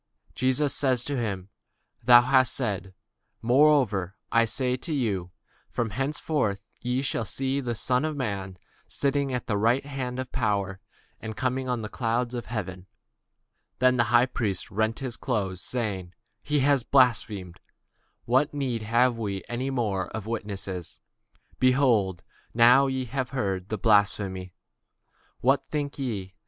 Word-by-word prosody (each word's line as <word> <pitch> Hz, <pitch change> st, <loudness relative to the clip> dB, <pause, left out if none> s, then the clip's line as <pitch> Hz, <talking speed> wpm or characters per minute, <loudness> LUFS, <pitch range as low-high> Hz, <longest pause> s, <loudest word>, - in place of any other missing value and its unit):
Jesus 130 Hz, +3 st, +1 dB
saith 130 Hz, -4 st, +1 dB
unto 145 Hz, -, -1 dB
him, 100 Hz, -4 st, -4 dB, 0.5 s
Thou 120 Hz, +1 st, +8 dB
hast 130 Hz, 0 st, +3 dB
said: 100 Hz, -7 st, -2 dB, 0.5 s
nevertheless 120 Hz, -8 st, +3 dB, 0.2 s
I 115 Hz, 0 st, +4 dB
say 125 Hz, +2 st, -1 dB
unto 130 Hz, +6 st, -3 dB
you, 100 Hz, -10 st, -1 dB, 0.4 s
Hereafter 130 Hz, 0 st, -1 dB
shall 100 Hz, -, -22 dB, 0.2 s
ye 125 Hz, +2 st, -1 dB
see 135 Hz, +2 st, -1 dB
the 120 Hz, -3 st, -2 dB
Son 125 Hz, +4 st, 0 dB
of 155 Hz, -1 st, -2 dB
man 100 Hz, -8 st, -4 dB, 0.3 s
sitting 140 Hz, -1 st, 0 dB
on 125 Hz, -1 st, -1 dB
the 105 Hz, -2 st, -1 dB
right 120 Hz, +6 st, +2 dB
hand 130 Hz, -3 st, -4 dB
of 130 Hz, -1 st, -5 dB
power, 100 Hz, -4 st, -1 dB, 0.4 s
and 110 Hz, -1 st, -6 dB
coming 130 Hz, +2 st, -1 dB
in 125 Hz, -3 st, -1 dB
the -, -, -3 dB
clouds 120 Hz, +2 st, -1 dB
of 120 Hz, -1 st, -5 dB
heaven. 95 Hz, -5 st, -5 dB, 0.9 s
Then 125 Hz, 0 st, +4 dB
the 120 Hz, -, +4 dB
high 120 Hz, +2 st, +4 dB
priest 105 Hz, -7 st, -3 dB
rent 110 Hz, +2 st, 0 dB
his 125 Hz, -3 st, -5 dB
clothes, 95 Hz, -7 st, -2 dB
saying, 95 Hz, -6 st, -4 dB, 0.3 s
He 150 Hz, -1 st, 0 dB
hath 140 Hz, 0 st, +4 dB
spoken 115 Hz, -, -15 dB
blasphemy; 115 Hz, -8 st, +2 dB, 0.7 s
what 130 Hz, +5 st, +3 dB
further 145 Hz, -, -10 dB
need 125 Hz, -5 st, -1 dB
have 120 Hz, +2 st, +2 dB
we 100 Hz, -3 st, -3 dB
of 115 Hz, -6 st, -2 dB
witnesses? 100 Hz, -5 st, -5 dB, 0.6 s
behold, 120 Hz, -9 st, +3 dB, 0.3 s
now 125 Hz, +4 st, +6 dB
ye 130 Hz, -1 st, -2 dB
have 130 Hz, +1 st, -3 dB
heard 95 Hz, -8 st, -2 dB
his 110 Hz, -, -2 dB
blasphemy. 95 Hz, -3 st, +2 dB, 0.9 s
What 135 Hz, +3 st, +3 dB
think 145 Hz, -1 st, -4 dB
ye? 100 Hz, -8 st, -3 dB
120 Hz, 145 wpm, -26 LUFS, 100-130 Hz, 0.9 s, Thou